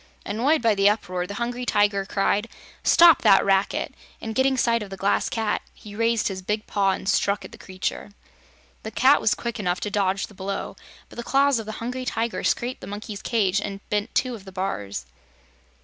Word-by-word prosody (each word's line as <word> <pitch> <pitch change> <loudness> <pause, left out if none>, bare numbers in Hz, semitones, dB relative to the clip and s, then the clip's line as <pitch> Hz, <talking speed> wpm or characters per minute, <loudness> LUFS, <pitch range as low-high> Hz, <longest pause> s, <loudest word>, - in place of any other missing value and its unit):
Annoyed 245 +8 +1
by 225 -2 +4
the 200 0 +4
uproar, 185 -4 -2
the 200 - -6
Hungry 240 +2 -3
Tiger 205 -4 +1
cried: 205 +2 0 0.3
"Stop 335 -3 +6
that 195 - +5
racket!" 195 0 +1 0.3
and 225 - -5
getting 265 +2 +2
sight 235 -2 +2
of 205 - -6
the 195 - -7
Glass 195 +1 +1
Cat, 220 -2 -1
he 210 -2 -12
raised 230 0 +1
his 190 -2 -4
big 210 +3 -2
paw 200 -1 +1
and 190 - -6
struck 200 +1 +1
at - - -11
the - - -12
creature. 185 +2 -4 0.7
The 220 - -6
cat 265 +5 +4
was 210 - +2
quick 235 -1 -5
enough 180 -3 -1
to 210 - -3
dodge 195 -1 0
the - - -17
blow, 195 0 -5 0.3
but - - -15
the 235 - -4
claws 275 0 +3
of 220 - -7
the 220 - -4
Hungry 250 +3 -5
Tiger 230 -1 -2
scraped 245 +2 -1
the - - -8
monkey's 205 0 -6
cage 200 -4 +1
and 195 -1 -5
bent 210 0 -1
two 255 -1 +1
of 215 -5 -9
the 190 - -10
bars. 105 - -4
210 Hz, 205 wpm, -24 LUFS, 195-235 Hz, 0.7 s, Stop